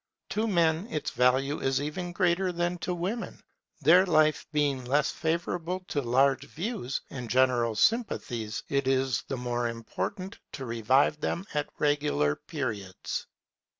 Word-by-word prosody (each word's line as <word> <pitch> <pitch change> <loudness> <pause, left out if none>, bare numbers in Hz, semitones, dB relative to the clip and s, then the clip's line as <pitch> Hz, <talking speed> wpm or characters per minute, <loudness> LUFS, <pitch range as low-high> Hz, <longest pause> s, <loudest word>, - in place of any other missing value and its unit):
To 220 +2 0
men 170 -1 +2
its 155 -11 -3
value 130 +3 +2
is 135 0 +1
even 165 +5 -4
greater 180 +1 +1
than 175 0 -1
to 165 +2 -3
women; 195 +7 -3 0.4
their 180 +3 +7
life 155 -4 +3
being 145 -4 +1
less 140 +4 +2
favourable 170 +2 -2
to 145 - 0
large 135 +2 +2
views 170 - -3
and 125 -4 -6
general 125 -3 +3
sympathies, 120 - 0
it 140 -1 0
is 130 -3 +2
the 135 - -3
more 120 -1 -1
important 115 - -5
to 135 - -5
revive 130 +6 +2
them 175 - -2
at 150 -1 -1
regular 145 - +1
periods. 110 - -4
145 Hz, 140 wpm, -28 LUFS, 125-175 Hz, 0.4 s, their